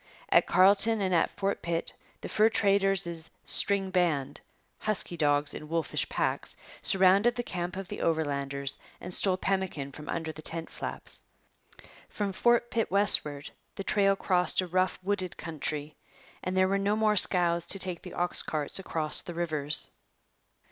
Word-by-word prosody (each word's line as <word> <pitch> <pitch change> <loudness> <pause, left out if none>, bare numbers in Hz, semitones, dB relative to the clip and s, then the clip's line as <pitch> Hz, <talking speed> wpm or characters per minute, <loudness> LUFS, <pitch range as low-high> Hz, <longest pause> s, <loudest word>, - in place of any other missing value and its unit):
At - - +4
Carlton 200 +4 +3
and 190 -2 -1
at 170 - +2
Fort 195 0 -3
Pitt 170 -1 -3 0.3
the - - -6
fur 220 +1 +3
traders' 195 -6 0 0.2
'string 195 -1 +3
band' 150 -6 -1 0.4
husky 215 -4 -1
dogs 145 -2 +1
in 150 - -9
wolfish 165 -1 -2
packs - - -1 0.2
surrounded 195 +5 +4
the 240 - -3
camp 180 -3 -5
of 195 -1 -6
the - - -7
Overlanders 140 -3 -2 0.2
and 180 - -8
stole 185 0 +1
pemmican 190 -8 -3
from 150 +1 -11
under 165 -1 -3
the 155 - -11
tent 165 +1 -4
flaps. - - -7 0.9
From 205 -2 -4
Fort 240 +3 +1
Pitt 225 -1 -1
westward 150 -8 +5 0.2
the 195 - -6
trail 195 0 +2
crossed 180 -2 +1
a - - -4
rough, 185 +1 -1
wooded 190 -2 -3
country, 150 -2 -5 0.5
and 185 +1 -3
there 185 0 +3
were 195 +1 0
no 200 +2 0
more 215 -1 +1
scows 175 -3 +3
to - - +3
take 185 -3 0
the 180 - -10
ox 175 0 -1
carts 150 +3 -3
across 160 -5 +4
the 175 - -9
rivers. 155 -3 -1
180 Hz, 160 wpm, -28 LUFS, 160-195 Hz, 0.9 s, westward